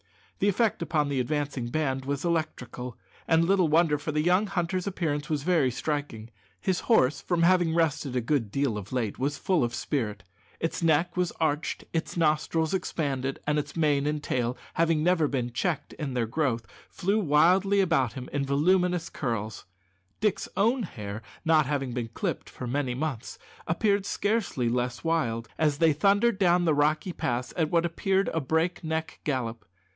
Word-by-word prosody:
The 205 Hz, -, +3 dB
effect 215 Hz, 0 st, +1 dB
upon 150 Hz, -3 st, 0 dB
the 140 Hz, -2 st, 0 dB
advancing 140 Hz, -2 st, -2 dB
band 135 Hz, -1 st, -1 dB
was 140 Hz, +3 st, -2 dB
electrical; 145 Hz, -7 st, -3 dB, 0.3 s
and 165 Hz, 0 st, +4 dB
little 190 Hz, -1 st, +3 dB
wonder, 155 Hz, -1 st, +3 dB
for 155 Hz, -, -3 dB
the 150 Hz, 0 st, 0 dB
young 180 Hz, +5 st, +3 dB
hunter's 185 Hz, 0 st, -1 dB
appearance 155 Hz, -5 st, -2 dB
was 150 Hz, -3 st, -1 dB
very 160 Hz, -6 st, +3 dB
striking. 125 Hz, -4 st, -4 dB, 0.3 s
His 185 Hz, -2 st, 0 dB
horse, 150 Hz, -, +3 dB
from 175 Hz, -2 st, 0 dB
having 175 Hz, -2 st, +4 dB
rested 150 Hz, -5 st, 0 dB
a 125 Hz, -, +1 dB
good 120 Hz, -3 st, 0 dB
deal 135 Hz, -2 st, 0 dB
of 100 Hz, 0 st, -11 dB
late, 120 Hz, -5 st, -2 dB
was 145 Hz, +2 st, -1 dB
full 180 Hz, -8 st, +1 dB
of 120 Hz, 0 st, -1 dB
spirit. 105 Hz, -10 st, -2 dB, 0.4 s
Its 165 Hz, -, -2 dB
neck 165 Hz, +1 st, +2 dB
was 180 Hz, -2 st, 0 dB
arched, 155 Hz, -1 st, -1 dB
its 165 Hz, +1 st, -2 dB
nostrils 160 Hz, +1 st, +1 dB
expanded, 135 Hz, -7 st, -2 dB
and 150 Hz, 0 st, +1 dB
its 150 Hz, +1 st, -6 dB
mane 145 Hz, -3 st, +2 dB
and 150 Hz, 0 st, -2 dB
tail 125 Hz, 0 st, -1 dB, 0.2 s
never 165 Hz, +1 st, +3 dB
having -, -, -1 dB
been 125 Hz, -3 st, -2 dB
checked 155 Hz, +2 st, -2 dB
in 135 Hz, -4 st, -5 dB
their 120 Hz, -2 st, +1 dB
growth 115 Hz, -2 st, -1 dB, 0.2 s
flew 200 Hz, +4 st, 0 dB
wildly 185 Hz, +4 st, +4 dB
around 155 Hz, -, +2 dB
him 125 Hz, 0 st, -7 dB
in 140 Hz, -1 st, 0 dB
voluminous 175 Hz, +5 st, +2 dB
curls. 110 Hz, -5 st, -3 dB, 0.5 s
Dick's 210 Hz, -2 st, 0 dB
own 235 Hz, +6 st, +3 dB
hair, 105 Hz, -, -6 dB, 0.2 s
not 155 Hz, -3 st, +4 dB
having 135 Hz, -4 st, -2 dB
been 120 Hz, -2 st, -2 dB
clipped 115 Hz, -, -4 dB
for -, -, -7 dB
many 125 Hz, 0 st, -1 dB
months, 135 Hz, -4 st, -4 dB, 0.3 s
appeared 200 Hz, +3 st, +1 dB
scarcely 205 Hz, -, 0 dB
less 125 Hz, +1 st, -1 dB
wild, 120 Hz, -9 st, 0 dB
as 150 Hz, -2 st, +2 dB
they 160 Hz, -1 st, +4 dB
thundered 200 Hz, +6 st, +3 dB
down 175 Hz, -2 st, +4 dB
the 160 Hz, -, +3 dB
rocky 155 Hz, +4 st, +1 dB
pass 125 Hz, -3 st, -2 dB
at 160 Hz, -3 st, +1 dB
what 170 Hz, 0 st, +2 dB
appeared 190 Hz, +3 st, +1 dB
a 165 Hz, -, -1 dB
break 160 Hz, +6 st, 0 dB
neck 160 Hz, 0 st, -3 dB
gallop. 120 Hz, -6 st, -2 dB
150 Hz, 175 wpm, -27 LUFS, 130-175 Hz, 0.5 s, and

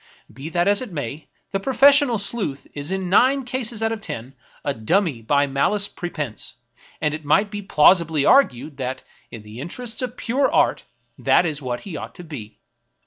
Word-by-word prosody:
Be 135 Hz, +7 st, -7 dB
that 175 Hz, +2 st, +1 dB
as 205 Hz, +3 st, +3 dB
it 250 Hz, -5 st, -6 dB
may, 145 Hz, -1 st, -5 dB, 0.2 s
the 195 Hz, -, -1 dB
pro 265 Hz, +7 st, -3 dB
fessional 275 Hz, -4 st, +5 dB
sleuth 200 Hz, -, -3 dB
is 145 Hz, +4 st, -3 dB
in 190 Hz, -1 st, -2 dB
nine 260 Hz, +8 st, +4 dB
cases 240 Hz, -3 st, -3 dB
out 225 Hz, -, +1 dB
of 225 Hz, -1 st, -4 dB
ten 125 Hz, -, -7 dB, 0.3 s
a 140 Hz, -, 0 dB
dummy 140 Hz, -, 0 dB
by 140 Hz, +5 st, +2 dB
malice 145 Hz, +10 st, 0 dB
prepense; 150 Hz, -, -6 dB, 0.4 s
and 150 Hz, -1 st, 0 dB
it 155 Hz, 0 st, -6 dB
might 200 Hz, +8 st, +2 dB
be 205 Hz, -1 st, -4 dB
plausibly 165 Hz, -4 st, +4 dB
argued 145 Hz, -, +3 dB
that, 130 Hz, -1 st, -4 dB, 0.3 s
in 110 Hz, -, -10 dB
the 105 Hz, +2 st, -11 dB
interests 225 Hz, -, -5 dB
of 250 Hz, -1 st, -4 dB
pure 265 Hz, +4 st, +1 dB
art, -, -, +2 dB, 0.3 s
that -, -, +4 dB
is 150 Hz, -3 st, -3 dB
what 125 Hz, -2 st, -4 dB
he 190 Hz, -6 st, -8 dB
ought -, -, -8 dB
to 180 Hz, -, -10 dB
be. 125 Hz, -10 st, -9 dB
170 Hz, 190 wpm, -22 LUFS, 140-220 Hz, 0.4 s, fessional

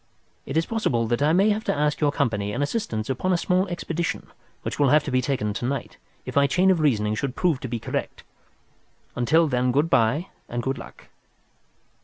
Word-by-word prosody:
It 135 Hz, -, -2 dB
is 165 Hz, -, +2 dB
possible 130 Hz, -, 0 dB
that 120 Hz, +2 st, 0 dB
I 150 Hz, +2 st, +4 dB
may 195 Hz, +5 st, +4 dB
have 215 Hz, +1 st, -1 dB
to -, -, 0 dB
ask 150 Hz, +1 st, 0 dB
your 145 Hz, -1 st, +3 dB
company 105 Hz, -8 st, -1 dB
and 145 Hz, -, -1 dB
assistance 140 Hz, -, -2 dB
upon 135 Hz, +8 st, -1 dB
a 180 Hz, -, +3 dB
small 185 Hz, +3 st, +1 dB
expedition 170 Hz, -1 st, -3 dB, 0.4 s
which -, -, -4 dB
will 140 Hz, -2 st, +4 dB
have 150 Hz, +2 st, +5 dB
be 150 Hz, -, -4 dB
undertaken 130 Hz, -5 st, 0 dB
to 120 Hz, -, -4 dB
night, 140 Hz, +2 st, -3 dB, 0.3 s
if -, -, -7 dB
my 140 Hz, 0 st, +5 dB
chain 180 Hz, +7 st, +3 dB
of 180 Hz, -, +2 dB
reasoning 110 Hz, -9 st, +2 dB
should 130 Hz, +4 st, -3 dB
prove 170 Hz, -7 st, +1 dB
to -, -, -5 dB
be 120 Hz, 0 st, -3 dB
correct. -, -, -4 dB, 0.9 s
Until 155 Hz, +7 st, +3 dB
then 125 Hz, -2 st, +1 dB
good 145 Hz, +6 st, +1 dB
bye 130 Hz, +10 st, +2 dB, 0.2 s
and 120 Hz, 0 st, -3 dB
good 135 Hz, +1 st, -2 dB
luck!" -, -, -12 dB
140 Hz, 205 wpm, -24 LUFS, 120-165 Hz, 0.9 s, have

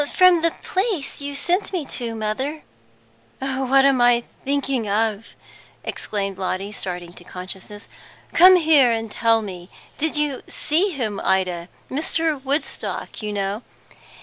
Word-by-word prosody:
"From 365 Hz, -1 st, +7 dB
the 335 Hz, -, +3 dB
the -, -, -16 dB
place 380 Hz, -, -1 dB
you 285 Hz, 0 st, -4 dB
sent 355 Hz, +7 st, 0 dB
me 355 Hz, -6 st, -2 dB
to, 235 Hz, -4 st, -4 dB
mother." 260 Hz, +8 st, -2 dB, 0.7 s
"What 270 Hz, 0 st, +2 dB
am 270 Hz, -3 st, +4 dB
I 240 Hz, 0 st, +5 dB, 0.2 s
thinking 275 Hz, -5 st, -1 dB
of!" 215 Hz, +1 st, 0 dB, 0.6 s
exclaimed 195 Hz, -2 st, -4 dB
Lotty, 190 Hz, +2 st, -2 dB
starting 175 Hz, -4 st, -4 dB
to -, -, -13 dB
consciousness. 190 Hz, +3 st, -8 dB, 0.5 s
"Come 370 Hz, +2 st, +9 dB
here, 310 Hz, -7 st, +5 dB
and 225 Hz, -1 st, -2 dB
tell 225 Hz, 0 st, +3 dB
me. 180 Hz, -3 st, -8 dB, 0.3 s
Did 315 Hz, 0 st, 0 dB
you 295 Hz, -3 st, 0 dB
see 330 Hz, +7 st, +1 dB
see -, -, -2 dB
him, 230 Hz, -, -3 dB
Ida? 180 Hz, -2 st, 0 dB, 0.2 s
Mr. 310 Hz, 0 st, -1 dB
Woodstock, 280 Hz, -2 st, -3 dB
you 210 Hz, -1 st, -3 dB
know." 200 Hz, +1 st, -2 dB
245 Hz, 145 wpm, -22 LUFS, 205-295 Hz, 0.7 s, Come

